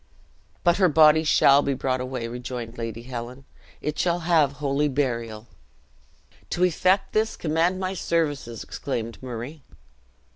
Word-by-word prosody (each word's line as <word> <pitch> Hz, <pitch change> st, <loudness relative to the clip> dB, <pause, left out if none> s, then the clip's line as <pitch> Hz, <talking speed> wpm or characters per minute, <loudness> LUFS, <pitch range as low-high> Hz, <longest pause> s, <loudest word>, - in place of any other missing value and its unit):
"But 175 Hz, -1 st, +4 dB
her 185 Hz, -3 st, +4 dB
body 155 Hz, 0 st, +6 dB
shall 140 Hz, -2 st, +5 dB
be 140 Hz, -1 st, -1 dB
brought 130 Hz, -1 st, -1 dB
away," 125 Hz, -2 st, -4 dB
rejoined 120 Hz, -1 st, -6 dB
Lady 115 Hz, 0 st, -5 dB
Helen; 125 Hz, +1 st, -7 dB, 0.4 s
"it 150 Hz, -, -3 dB
shall 175 Hz, 0 st, +1 dB
have 160 Hz, -5 st, +3 dB
holy 145 Hz, +1 st, 0 dB
burial." 120 Hz, -6 st, -2 dB, 1.0 s
"To 175 Hz, -, 0 dB
effect 185 Hz, +2 st, +2 dB
this, 220 Hz, +1 st, 0 dB
command 165 Hz, +3 st, 0 dB
my 185 Hz, 0 st, -2 dB
services," 145 Hz, -, -2 dB
exclaimed 115 Hz, -4 st, -5 dB
Murray. 130 Hz, +4 st, -7 dB
140 Hz, 135 wpm, -24 LUFS, 120-165 Hz, 1.0 s, body